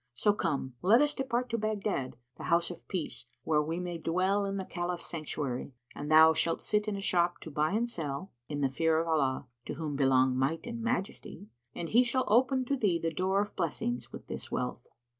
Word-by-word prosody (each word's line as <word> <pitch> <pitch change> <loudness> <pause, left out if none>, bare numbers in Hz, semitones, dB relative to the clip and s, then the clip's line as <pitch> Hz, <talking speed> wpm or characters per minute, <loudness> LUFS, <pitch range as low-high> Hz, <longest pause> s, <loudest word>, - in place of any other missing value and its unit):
So 205 - +3
come, 145 -9 -2
let 210 +7 +6
us 295 +1 +3
depart 250 -2 -1
to 230 - 0
Baghdad, 210 - -2 0.2
the - - -8
House[FN#82] 170 +1 +2
of 175 - -11
Peace, 170 -9 -4 0.2
where 150 -1 +3
we 160 +3 -2
may 175 -2 -4
dwell 185 +5 +1
in 195 0 -2
the 190 - -3
Caliph's 175 -1 -3
Sanctuary, 145 -5 -4 0.2
and 150 +1 -5
thou 160 +1 +8
shalt 165 +1 0
sit 210 0 +1
in 210 - -1
a - - -5
shop 175 -2 +2
to 160 - -8
buy 150 +5 +1
and 230 +3 +1
sell, 170 -3 -4 0.2
in 145 -1 -3
the 135 - +4
fear 160 +4 +1
of 165 - -1
Allah 140 -5 +1 0.2
(to - - -4
whom 155 -3 -3
belong 130 -2 +4
Might 135 +5 0
and 235 -1 -5
Majesty!) 225 - -3 0.3
and 165 - -4
He 240 +3 +6
shall 255 +2 0
open 260 +4 +3
to 275 +2 0
thee 200 -8 +2
the 165 0 -2
door 190 +3 +1
of 210 - -5
blessings 145 -8 -2
with - - -9
this - - -6
wealth." - - -3
175 Hz, 215 wpm, -31 LUFS, 150-210 Hz, 0.3 s, thou